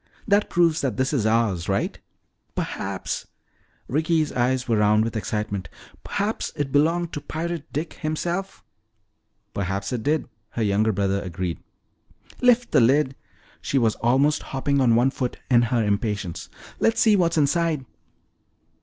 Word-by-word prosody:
That 205 0 +3
proves 170 -2 +3
that 135 -3 -1
this 130 +3 0
is 115 -7 +1
ours, 110 -6 +1
all - - +3
right." 100 - -2 0.6
"Perhaps - - -3 0.3
" - - -38
Ricky's 155 +2 +1
eyes 125 +1 0
were 115 -2 +2
round 105 +1 +4
with 115 -1 -3
excitement, 105 -4 -3 0.3
"perhaps 205 +2 -2
it 145 -2 -2
belonged 165 +4 +2
to 145 - -4
Pirate 165 0 -4
Dick 155 +3 -3
himself!" 170 +5 -3 0.9
"Perhaps 95 +2 -2
it 120 - -2
did," 150 +5 0 0.3
her 115 - +1
younger 105 +2 +2
brother 100 0 0
agreed. 90 -2 -4 0.8
"Lift 245 -1 +4
the 145 - +5
lid." 130 +3 +3 0.5
She 140 - -1
was 115 -4 +3
almost 135 +6 +2
hopping 140 +1 -1
on 120 -3 +4
one 125 +3 +3
foot 125 -2 -3
in 120 -1 +6
her 120 -1 +1
impatience. 100 -5 -2 0.3
"Let's 225 - +2
see 220 -2 +5
what's 170 -4 +2
inside." 155 -1 +1
130 Hz, 150 wpm, -24 LUFS, 105-155 Hz, 0.9 s, in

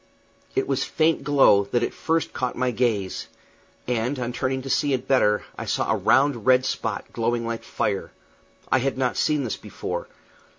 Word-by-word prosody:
It 135 - +1
was 135 0 0
faint 160 -2 +1
glow 135 -8 +5
that 120 +4 0
at - - -2
first 165 0 -1
caught 125 0 -2
my 125 0 0
gaze; 110 -6 -1 0.6
and, 125 +3 -1
on 125 -1 -3
turning 130 +1 -1
to - - -7
see 145 +2 +2
it 130 - -2
better, 105 -6 +3 0.2
I - - -4
saw - - 0
a - - +3
round 135 -4 +2
red 130 0 +5
spot 110 -5 -3
glowing 115 0 0
like 115 0 -3
fire. 100 -2 -2 0.6
I 130 - +4
had 135 +1 -1
not 130 -2 0
seen 150 -2 +1
this 115 - -3
before. - - -5
125 Hz, 180 wpm, -24 LUFS, 115-135 Hz, 0.6 s, glow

